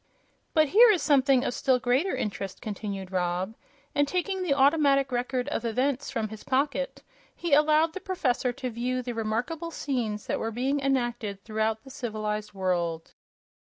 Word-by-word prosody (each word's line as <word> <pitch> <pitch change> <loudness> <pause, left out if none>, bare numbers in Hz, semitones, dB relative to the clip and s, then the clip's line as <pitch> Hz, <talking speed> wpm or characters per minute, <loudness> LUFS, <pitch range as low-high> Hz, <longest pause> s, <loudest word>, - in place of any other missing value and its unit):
"But 310 -2 +4
here 460 - +8
is 390 -6 +3
something 270 -3 +4
of - - -1
still 260 0 +2
greater 255 +9 +1
interest," 195 -2 -4
continued 200 -3 -5
Rob, 180 +2 -1 0.4
and 290 0 +2
taking 370 +4 -1
the 330 -7 +1
Automatic 275 -1 +4
Record 250 +1 -1
of 240 - -2
Events 255 +4 0
from 225 -5 -2
his 220 0 -9
pocket 285 - -1 0.3
he 340 -4 -2
allowed 305 +2 +4
the 385 - -5
professor 270 -10 0
to 255 0 -5
view 250 +2 -2
the 245 0 -4
remarkable 240 +10 -2
scenes 240 -9 -3
that - - -1
were 225 - -2
being 260 +5 0
enacted 240 -7 -1
throughout 220 0 -1
the 270 - -12
civilized 215 -4 -3
world. 175 -4 -2
250 Hz, 165 wpm, -27 LUFS, 215-285 Hz, 0.4 s, here